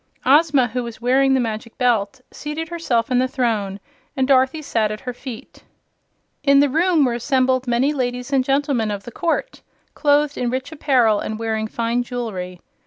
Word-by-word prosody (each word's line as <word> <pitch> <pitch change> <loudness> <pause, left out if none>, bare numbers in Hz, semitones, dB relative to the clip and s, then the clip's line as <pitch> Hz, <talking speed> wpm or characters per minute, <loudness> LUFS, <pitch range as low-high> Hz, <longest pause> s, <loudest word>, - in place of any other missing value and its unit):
Ozma, 285 -2 +4
who 250 +3 -2
was 235 -2 -7
wearing 265 +3 +3
the - - +2
Magic 225 -1 -4
Belt, 235 -3 0
seated 310 +2 -5
herself 285 -8 -1
in 250 - +3
the 255 - +2
throne, 220 -7 -1 0.4
and 260 -1 +1
Dorothy 270 +3 +3
sat 225 -6 0
at 215 - -6
her 250 - -5
feet. 245 -2 -10 0.8
In 280 -1 +5
the 285 0 +4
room 325 +1 +3
were 245 - 0
assembled 255 +1 +1
many 245 +5 +2
ladies 250 -1 -3
and 265 -1 +3
gentlemen 270 -4 0
of 200 -1 -4
the 240 - -9
court, 340 - -2 0.3
clothed 290 -1 +2
in 245 - 0
rich 260 +4 -3
apparel 255 -8 +2
and 215 - -4
wearing 220 -1 -2
fine 235 +2 -1
jewelry. 215 -8 -5
250 Hz, 175 wpm, -21 LUFS, 230-280 Hz, 0.8 s, In